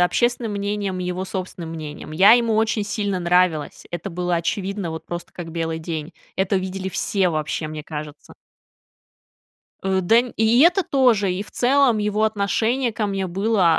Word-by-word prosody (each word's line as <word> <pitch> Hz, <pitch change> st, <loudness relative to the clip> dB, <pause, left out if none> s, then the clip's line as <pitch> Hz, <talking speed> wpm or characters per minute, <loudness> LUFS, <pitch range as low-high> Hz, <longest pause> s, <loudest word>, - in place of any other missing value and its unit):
общественным 240 Hz, +5 st, +1 dB
мнением, 200 Hz, -2 st, -2 dB
и 180 Hz, -, -3 dB
его 180 Hz, +1 st, -3 dB
собственным 185 Hz, -3 st, -5 dB
мнением, 155 Hz, -2 st, -7 dB
я 190 Hz, +7 st, +7 dB
ему 230 Hz, -2 st, +3 dB
очень 220 Hz, -1 st, +1 dB
сильно 205 Hz, -2 st, -2 dB
нравилась, 175 Hz, -3 st, +1 dB
это 185 Hz, +3 st, -4 dB
было 175 Hz, +1 st, -1 dB
очевидно, 190 Hz, +1 st, -2 dB
вот 160 Hz, -, -7 dB
просто 175 Hz, 0 st, -6 dB
как 165 Hz, -2 st, -8 dB
белый 165 Hz, -1 st, -2 dB
день, 160 Hz, 0 st, -5 dB, 0.2 s
это 190 Hz, +1 st, +1 dB
видели 190 Hz, 0 st, -3 dB
все 190 Hz, 0 st, 0 dB
вообще, 155 Hz, 0 st, -2 dB
мне 155 Hz, -1 st, -7 dB
кажется. 150 Hz, -1 st, -8 dB, 1.5 s
Э, 190 Hz, 0 st, +1 dB
да, 225 Hz, +6 st, +5 dB, 0.2 s
и 225 Hz, +3 st, +4 dB
это 355 Hz, +5 st, +5 dB
тоже, 240 Hz, -, +3 dB
и, 185 Hz, +3 st, -3 dB
в -, -, -14 dB
целом, 255 Hz, -2 st, +3 dB
его 210 Hz, +1 st, +1 dB
отношение 220 Hz, +4 st, 0 dB
ко 215 Hz, -2 st, -1 dB
мне 195 Hz, -1 st, -2 dB
было 190 Hz, -2 st, +2 dB
190 Hz, 165 wpm, -22 LUFS, 170-215 Hz, 1.5 s, я